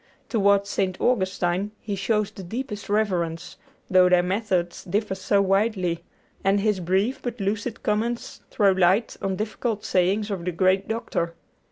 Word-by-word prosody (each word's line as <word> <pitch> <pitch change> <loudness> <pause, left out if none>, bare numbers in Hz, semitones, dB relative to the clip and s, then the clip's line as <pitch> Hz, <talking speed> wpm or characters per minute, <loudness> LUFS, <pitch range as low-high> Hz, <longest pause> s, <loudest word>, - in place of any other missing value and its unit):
Toward 200 -3 +3
St. 190 -2 -1
Augustine 190 -3 0
he 205 -2 -4
shows 210 +1 0
the - - -9
deepest 210 +2 -5
reverence, 180 -6 -1 0.3
though 185 -1 +5
their 180 -1 +4
methods 185 -2 -1
differ 200 +2 -1
so 200 +1 +1
widely, 190 -4 +1 0.4
and 195 +1 +3
his 210 -1 +1
brief 190 +8 0
but 245 -1 -5
lucid 210 +3 -2
comments 230 +3 -2
throw 200 -3 +3
light 190 +4 +2
on 195 -1 -1
difficult 215 +1 -3
sayings 195 +4 +1
of 190 -4 -3
the 180 - -1
great 185 +3 +2
Doctor. 220 -7 -2
195 Hz, 150 wpm, -24 LUFS, 185-215 Hz, 0.4 s, though